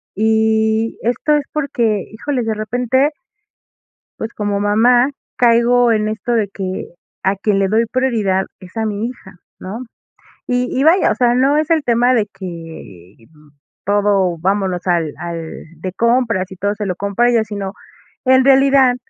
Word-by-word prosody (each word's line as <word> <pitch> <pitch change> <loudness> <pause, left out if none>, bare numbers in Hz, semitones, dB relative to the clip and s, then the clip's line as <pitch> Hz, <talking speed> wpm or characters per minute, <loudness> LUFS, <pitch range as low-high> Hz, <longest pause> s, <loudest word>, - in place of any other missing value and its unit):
y 220 +1 +1
esto 250 +6 +1
es 295 - 0
porque, 235 -9 -1
híjole, 250 +4 -3
de 225 -1 -1
repente 245 +6 0 1.1
pues, 225 +1 -4
como 205 -1 -2
mamá 240 +5 +3 0.3
caigo 240 0 +4
en 215 -1 0
esto 220 +3 -3
de 220 -3 +1
que 190 -1 -5 0.4
a 195 +1 +1
quien 200 0 0
le 195 - +1
doy 225 +3 +2
prioridad 220 -7 0
es 185 +3 -14
a 225 - -1
mi 210 +1 -2
hija, 210 -6 -10 0.2
¿no? 215 +7 -7 0.6
Y 250 0 0
y, - - +2
vaya, 340 +5 +4
o - - +1
sea, 245 -1 +2
no 270 +4 +3
es 310 +1 0
el 325 -2 +3
tema 245 +1 +3
de 220 -4 +1
que, 165 - -10
mm, 150 -1 -22 0.4
todo 200 -3 +2
vámonos 190 0 -1
al 170 -4 +1
al 170 -2 -6 0.2
de 185 +1 -4
compras 230 -4 +1
y 190 - -10
todo 200 +3 -1
se 210 0 -4
lo 180 -2 -2
compra 200 +5 0
a - - +4
ella, 230 -2 +2
sino, 200 -3 -5 0.5
en 260 0 +4
realidad 270 -1 +5
220 Hz, 165 wpm, -17 LUFS, 195-245 Hz, 1.1 s, realidad